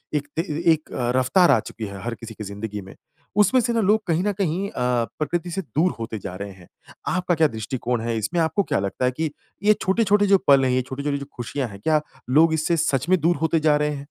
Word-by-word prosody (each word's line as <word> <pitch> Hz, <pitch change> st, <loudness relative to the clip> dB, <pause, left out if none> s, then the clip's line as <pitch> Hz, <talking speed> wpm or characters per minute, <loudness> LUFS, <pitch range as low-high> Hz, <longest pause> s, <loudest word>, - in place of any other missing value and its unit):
एक 145 Hz, -1 st, -1 dB
ते 165 Hz, -, +1 dB
ए 160 Hz, -3 st, -4 dB
एक 155 Hz, 0 st, -6 dB, 0.3 s
रफ़्तार 130 Hz, +8 st, +4 dB
आ -, -, +5 dB
चुकी 110 Hz, 0 st, -7 dB
है 100 Hz, -1 st, -8 dB
हर 120 Hz, +1 st, -3 dB
किसी 115 Hz, -1 st, -9 dB
की 110 Hz, -, -8 dB
जिंदगी 105 Hz, +1 st, -6 dB
में। 95 Hz, 0 st, -12 dB, 0.5 s
उसमें 255 Hz, +5 st, +4 dB
से 235 Hz, 0 st, 0 dB
ना 230 Hz, -, +2 dB
लोग 215 Hz, +2 st, +3 dB
कहीं 170 Hz, +2 st, +1 dB
ना 205 Hz, -, +1 dB
कहीं 190 Hz, 0 st, -1 dB
अ, -, -, -16 dB, 0.5 s
प्रकृति 175 Hz, +3 st, -2 dB
से 195 Hz, -, -2 dB
दूर 160 Hz, -, 0 dB
होते 115 Hz, -2 st, -4 dB
जा 90 Hz, -2 st, -7 dB
रहे 100 Hz, +1 st, -6 dB
हैं। 90 Hz, -2 st, -16 dB, 0.4 s
आपका 180 Hz, -2 st, +1 dB
क्या 160 Hz, 0 st, +4 dB
दृष्टिकोण 115 Hz, +1 st, -3 dB
है 115 Hz, -1 st, -2 dB
इसमें, 165 Hz, -, -1 dB
आपको 165 Hz, +5 st, +1 dB
क्या -, -, 0 dB
लगता 100 Hz, +6 st, -2 dB
है 125 Hz, -, +2 dB
कि 155 Hz, +4 st, -2 dB, 0.3 s
ये 215 Hz, +1 st, +6 dB
छोटे-छोटे 205 Hz, +1 st, +3 dB
जो 195 Hz, 0 st, +6 dB
पल 135 Hz, -1 st, +6 dB
हैं, 130 Hz, -, +2 dB
ये 130 Hz, 0 st, +2 dB
छोटी-छोटी 140 Hz, +3 st, -3 dB
जो 140 Hz, -, -6 dB
खुशियाँ 125 Hz, +2 st, -3 dB
है, 100 Hz, -, -10 dB
क्या 155 Hz, +4 st, +2 dB, 0.3 s
लोग 160 Hz, +4 st, +5 dB
इससे 160 Hz, +2 st, +1 dB
सच 145 Hz, -2 st, 0 dB
में 185 Hz, -1 st, +4 dB
दूर 170 Hz, +3 st, +3 dB
होते 160 Hz, 0 st, +2 dB
जा 150 Hz, -1 st, +3 dB
रहे 150 Hz, 0 st, 0 dB
हैं? 145 Hz, -1 st, -4 dB
150 Hz, 245 wpm, -23 LUFS, 115-175 Hz, 0.5 s, ये